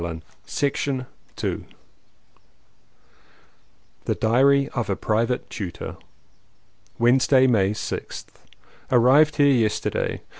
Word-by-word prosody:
206 85 Hz, -, -4 dB, 0.6 s
II -, -, -2 dB, 2.4 s
THE -, -, 0 dB
DIARY 135 Hz, +5 st, +3 dB
OF 120 Hz, -4 st, -3 dB
A 100 Hz, -, +1 dB
PRIVATE 115 Hz, +5 st, -1 dB
TUTOR 95 Hz, -5 st, -6 dB, 1.0 s
Wednesday, 130 Hz, +2 st, +4 dB
May 105 Hz, -7 st, +3 dB
6th. 105 Hz, -, -5 dB, 0.7 s
ARRIVED 130 Hz, +5 st, +5 dB
here 145 Hz, -1 st, +4 dB
yesterday. 110 Hz, -4 st, -1 dB
120 Hz, 80 wpm, -23 LUFS, 105-135 Hz, 2.4 s, ARRIVED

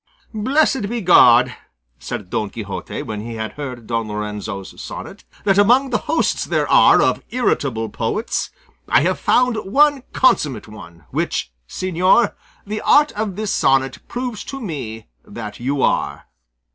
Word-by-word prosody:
"Blessed 260 Hz, 0 st, +1 dB
be 240 Hz, +1 st, -2 dB
God," 125 Hz, -, +6 dB, 0.4 s
said 90 Hz, +9 st, -6 dB
Don 110 Hz, -3 st, -1 dB
Quixote 100 Hz, -3 st, -6 dB
when 105 Hz, -1 st, -5 dB
he 115 Hz, +1 st, -7 dB
had 110 Hz, -1 st, -4 dB
heard 130 Hz, -5 st, -7 dB
Don 115 Hz, -1 st, -2 dB
Lorenzo's 105 Hz, -2 st, -6 dB
sonnet, -, -, -9 dB, 0.2 s
"that 200 Hz, -1 st, +3 dB
among 250 Hz, +6 st, +4 dB
the 240 Hz, -, +1 dB
hosts 325 Hz, -, +1 dB
there -, -, 0 dB
are -, -, +6 dB
of -, -, +1 dB
irritable 135 Hz, -, 0 dB
poets 115 Hz, -, -2 dB, 0.4 s
I -, -, +5 dB
have -, -, 0 dB
found 250 Hz, -2 st, +2 dB
one 280 Hz, +7 st, +3 dB
consummate 140 Hz, -, +2 dB
one, 90 Hz, -6 st, -13 dB
which, -, -, -2 dB, 0.2 s
señor, 185 Hz, +5 st, +2 dB, 0.3 s
the 215 Hz, +1 st, -4 dB
art 295 Hz, +1 st, +4 dB
of 210 Hz, -3 st, -3 dB
this 215 Hz, 0 st, -2 dB
sonnet 135 Hz, 0 st, +2 dB
proves 245 Hz, -3 st, -4 dB
to 275 Hz, -, -6 dB
me 135 Hz, -, -6 dB, 0.2 s
that 105 Hz, -, -8 dB
you 135 Hz, +3 st, -1 dB
are!" -, -, 0 dB
145 Hz, 145 wpm, -20 LUFS, -, 0.4 s, God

